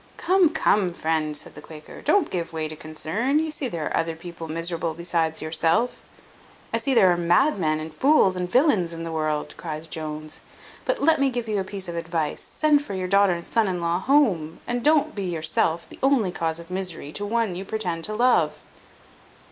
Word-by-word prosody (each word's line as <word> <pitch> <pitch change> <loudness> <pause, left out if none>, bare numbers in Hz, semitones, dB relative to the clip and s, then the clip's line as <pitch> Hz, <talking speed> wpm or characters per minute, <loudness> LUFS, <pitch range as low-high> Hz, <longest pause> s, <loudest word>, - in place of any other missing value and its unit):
"Come, 370 -2 +4
come, 205 - +2
friend," 155 -2 0
said - - -5
the - - -11
Quaker, 155 -1 -11
"don't 325 +2 +2
give 170 -2 -3
way 160 -1 -2
to 155 - -6
concern. 160 - -1
You 315 0 0
see 295 -3 -1
there 165 -9 -4
are - - -2
other 165 0 0
people 170 0 -8
miserable 165 0 -2
besides 165 -2 -1
yourself." 165 +9 +1 0.7
"I 230 - +2
see 265 +3 0
there 190 -6 +6
are 175 - +1
madmen, 175 - +2
and 155 0 -7
fools, 260 - +4
and 180 -1 -3
villains 215 - +3
in 165 - -6
the 165 - -5
world," 155 -2 -2
cries 155 -1 -5
Jones. 155 -1 -5 0.4
"But - - -1
let 320 0 +4
me 275 -1 +3
give 240 -2 -3
you 210 -2 0
a - - -1
piece 190 -1 -3
of 170 - -5
advice: 165 -2 -2
send 300 -2 +2
for 200 - -6
your 185 -1 -2
daughter 200 0 +4
and 170 0 -6
son 225 -3 +2
in 180 -2 -2
law 170 +1 0
home, 190 - +2
and 245 0 -2
don't 305 -1 +3
be 200 -2 -4
yourself 165 -1 0
the - - -13
only 260 -8 +3
cause 165 -2 -2
of 170 +1 -12
misery 180 -6 -4
to 205 - -3
one 220 -1 0
you 180 +2 -5
pretend 185 -6 -3
to 215 - -2
love." 245 +2 +2
180 Hz, 205 wpm, -24 LUFS, 160-230 Hz, 0.7 s, there